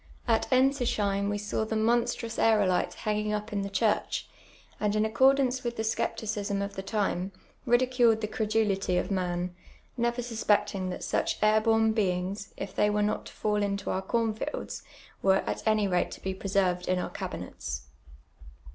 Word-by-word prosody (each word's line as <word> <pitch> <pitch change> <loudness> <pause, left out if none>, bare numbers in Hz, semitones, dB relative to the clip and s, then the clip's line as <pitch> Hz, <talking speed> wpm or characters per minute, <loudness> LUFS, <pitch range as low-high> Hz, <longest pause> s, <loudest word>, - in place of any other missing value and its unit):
At 225 -2 +2
Knsislieim 240 -7 +2
we 205 - -1
saw 205 +1 -2
the 220 0 -3
monstrotis 230 +1 +1
aerolite 205 -5 +3
h:Inii:in^' 210 0 0
up 210 0 -8
in 200 - 0
the 195 - -3
chiireli, 210 +2 +1 0.6
and 210 0 +1
in 215 0 +2
accordance 260 +3 +3
with 240 -1 -2
the 220 - -1
scepticism 215 -2 -1
of 200 - -5
the 190 - -3
time, 195 -2 -1 0.4
ridiculed 240 -2 +4
the 215 - -1
credulity 210 -4 0
of - - -1
man, 180 -1 -1 0.4
never 240 +1 0
susix'cting 210 -5 0
tliat 180 - -5
such - - 0
air 215 0 +5
born 225 0 +3
IxinLTs, 195 -1 -1
if 195 -1 -6
they 210 - +3
were 210 0 +1
not 210 - -1
to - - -12
fall 210 -1 0
into 200 0 -1
our 190 - -1
corn 225 +3 0
fields, 285 +7 -5 0.4
were 195 0 +3
at - - -3
any 215 -2 +3
rate 180 -2 +1
to - - -9
be 190 - -3
presi 190 -1 +1
rved 180 - -11
in 185 - +2
our 180 - -3
cabinets. 65 -2 -5
210 Hz, 175 wpm, -28 LUFS, 195-225 Hz, 0.6 s, air